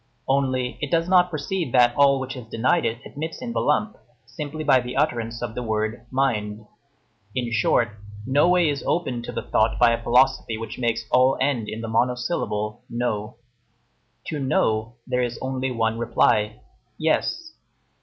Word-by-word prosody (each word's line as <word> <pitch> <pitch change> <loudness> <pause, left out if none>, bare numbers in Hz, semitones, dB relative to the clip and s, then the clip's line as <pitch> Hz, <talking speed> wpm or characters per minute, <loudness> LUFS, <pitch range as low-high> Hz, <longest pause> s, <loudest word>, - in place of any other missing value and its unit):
Only, 130 -2 0
it 145 - -2
does 165 +2 +1
not 180 -1 +5
perceive 160 -2 -3
that 120 -1 +5
all 140 -1 +5
which 130 0 -5
it 125 - -6
has - - -25
denied 130 +10 +1
it 115 - -2
admits 160 +3 -6
in 235 -2 -5
the - - 0
lump, 215 0 +1 0.3
simply 155 +1 -6
by 135 -3 +5
the 125 +1 -6
utterance 120 -5 -1
of 120 - -4
the 125 - -4
word, 110 +1 -2
mind. 110 -5 -1 0.7
In 120 -2 -2
short, 115 +1 +2 0.4
no 140 +6 +3
way 180 -2 +4
is 145 -1 -1
open 130 -9 0
to 120 - -6
the - - -4
thought 110 +1 +1
by 120 -1 +5
a 115 - -1
philosophy 120 -2 +2
which 115 +2 -7
makes 115 -2 -1
all 130 +1 +4
end 130 -5 0
in 110 - -5
the 115 - -4
monosyllable, 115 -2 -1
No. 115 -3 -2 0.9
To 150 - -4
No 115 -4 0
there 125 - 0
is 120 -1 -2
only 130 0 -2
one 115 -2 -1
reply, 110 -1 +1 0.4
Yes. 315 - 0
125 Hz, 175 wpm, -24 LUFS, 115-140 Hz, 0.9 s, not